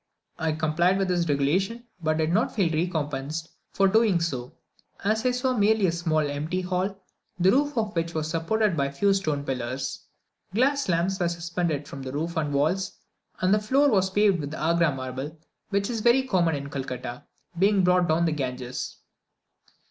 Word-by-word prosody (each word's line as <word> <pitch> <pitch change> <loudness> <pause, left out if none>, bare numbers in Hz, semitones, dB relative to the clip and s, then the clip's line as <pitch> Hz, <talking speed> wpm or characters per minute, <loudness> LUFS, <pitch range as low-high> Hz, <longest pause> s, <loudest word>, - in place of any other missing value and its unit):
I 160 -1 0
complied 165 +4 +2
with 195 -1 0
this 175 -2 +1
regulation, 185 +12 +1 0.2
but 155 -1 +1
did 160 0 +1
not 215 +6 +1
feel 180 -6 +1
recompensed 155 -2 -2 0.2
for 195 - +2
so 190 - -1
doing, 220 -5 +4 0.8
as 215 +3 +1
I 255 - +3
saw 250 +1 0
merely 215 -1 +3
a 175 - +3
small 160 -3 0
empty 150 +6 -2
hall, 185 +2 -2 0.4
the 185 +2 +5
roof 290 +3 +1
of 215 -3 -1
which 165 0 -2
was 155 -1 -1
supported 170 +5 +1
by 140 -3 +1
a - - -6
few 195 +8 +2
stone 155 -7 -1
pillars. 130 0 -3 0.6
Glass 275 +1 +2
lamps 180 +3 +1
were 175 -2 +1
suspended 170 -3 -2
from 140 - -8
the 130 -1 -5
roof 165 +4 -3
and 155 -3 -1
walls, 160 +7 0 0.5
and 185 +2 +3
the 210 - +4
floor 270 +7 +3
was 190 -3 +3
paved 200 -2 +3
with 145 +1 -4
Agra 170 0 +2
marble, 135 +3 -5 0.3
which 200 0 0
is 230 -3 -3
very 240 +4 +4
common 175 - +1
in 140 0 -6
Calcutta, 125 -3 -5 0.3
being 200 0 +4
brought 180 -1 +3
down 165 +2 +3
the 165 - +1
Ganges. 125 -3 -4
170 Hz, 180 wpm, -26 LUFS, 150-200 Hz, 0.8 s, the